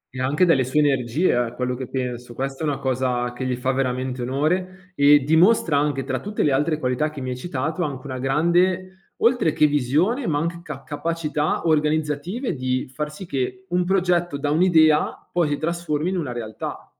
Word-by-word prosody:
E -, -, -5 dB
anche 145 Hz, +7 st, +2 dB
dalle 150 Hz, -7 st, +4 dB
sue 130 Hz, +4 st, -3 dB
energie, 135 Hz, +3 st, +1 dB
eh, 120 Hz, -1 st, -1 dB
quello 125 Hz, 0 st, -2 dB
che 125 Hz, 0 st, -5 dB
penso. 125 Hz, -2 st, -5 dB
Questa 135 Hz, +3 st, -4 dB
è -, -, 0 dB
una 145 Hz, -2 st, 0 dB
cosa 125 Hz, -2 st, -1 dB
che 130 Hz, +1 st, -4 dB
gli 125 Hz, -, 0 dB
fa 130 Hz, +2 st, -1 dB
veramente 130 Hz, -1 st, -2 dB
onore 180 Hz, +9 st, -2 dB
e 145 Hz, -2 st, +6 dB
dimostra 160 Hz, 0 st, +4 dB
anche 145 Hz, -2 st, 0 dB
tra 130 Hz, -1 st, -2 dB
tutte 205 Hz, -, -2 dB
le 145 Hz, -, +2 dB
altre 150 Hz, +3 st, +1 dB
qualità 130 Hz, +2 st, 0 dB
che 150 Hz, -, -9 dB
mi 130 Hz, -1 st, -4 dB
hai -, -, -3 dB
citato, 155 Hz, +4 st, -3 dB
anche 140 Hz, -2 st, -5 dB
una 130 Hz, -2 st, -5 dB
grande, 180 Hz, +7 st, 0 dB
oltre 230 Hz, -, +2 dB
che 150 Hz, -, +4 dB
visione 150 Hz, -, +1 dB
ma 145 Hz, -3 st, +1 dB
anche 170 Hz, +2 st, -2 dB
ca 150 Hz, -6 st, -8 dB
capacità 155 Hz, 0 st, -2 dB
organizzative 155 Hz, -, 0 dB
di 130 Hz, -2 st, -2 dB
far 150 Hz, +2 st, -3 dB
sì 150 Hz, +5 st, -9 dB
che 165 Hz, +6 st, -3 dB
un 175 Hz, 0 st, +1 dB
progetto 175 Hz, -4 st, +1 dB
da 145 Hz, +1 st, -1 dB
un'idea 160 Hz, -2 st, +3 dB
poi 175 Hz, -2 st, +1 dB
si 145 Hz, -, -1 dB
trasformi 165 Hz, 0 st, -2 dB
in 190 Hz, -, -1 dB
una 145 Hz, -8 st, -3 dB
realtà. 110 Hz, -3 st, -6 dB
150 Hz, 195 wpm, -23 LUFS, 130-170 Hz, -, e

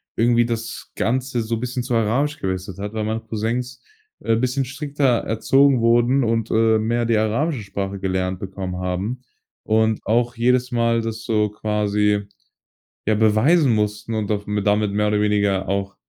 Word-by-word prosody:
irgendwie 120 Hz, 0 st, +3 dB
das 115 Hz, -1 st, -5 dB
Ganze 125 Hz, +1 st, -1 dB
so 115 Hz, +1 st, -2 dB
bisschen 125 Hz, +1 st, -3 dB
zu 125 Hz, 0 st, -3 dB
arabisch 130 Hz, +8 st, 0 dB
gewechselt 95 Hz, 0 st, -4 dB
hat, 105 Hz, +1 st, -5 dB
weil 110 Hz, -1 st, -2 dB
meine 110 Hz, +1 st, -2 dB
Cousins, 120 Hz, +4 st, -3 dB, 0.4 s
äh, 115 Hz, -, +1 dB
bisschen 130 Hz, +3 st, 0 dB
strikter 140 Hz, -2 st, 0 dB
erzogen 135 Hz, +3 st, +3 dB
wurden 120 Hz, +3 st, +3 dB
und, 115 Hz, -1 st, 0 dB
äh, 110 Hz, 0 st, +3 dB
mehr 115 Hz, +2 st, 0 dB
die 115 Hz, -1 st, +2 dB
arabische 115 Hz, +6 st, 0 dB
Sprache 100 Hz, 0 st, -4 dB
gelernt 95 Hz, -1 st, -2 dB
bekommen 95 Hz, -1 st, -5 dB
haben. 90 Hz, +7 st, -3 dB, 0.4 s
Und 110 Hz, 0 st, +2 dB
auch 120 Hz, +3 st, +1 dB
jedes 125 Hz, +2 st, +1 dB
Mal 115 Hz, -1 st, +1 dB
das 115 Hz, 0 st, -5 dB
so 105 Hz, -2 st, +1 dB
quasi 105 Hz, -1 st, 0 dB, 0.8 s
ja 110 Hz, -, +2 dB
beweisen 115 Hz, +8 st, +4 dB
mussten 105 Hz, +1 st, -1 dB
und 110 Hz, -1 st, -2 dB
auch 105 Hz, -1 st, -2 dB
mi 105 Hz, -1 st, -1 dB
damit 105 Hz, 0 st, +2 dB
mehr 105 Hz, +1 st, +1 dB
oder 105 Hz, 0 st, +1 dB
weniger 100 Hz, -2 st, +1 dB
auch 100 Hz, 0 st, -2 dB
110 Hz, 165 wpm, -21 LUFS, 105-120 Hz, 0.8 s, beweisen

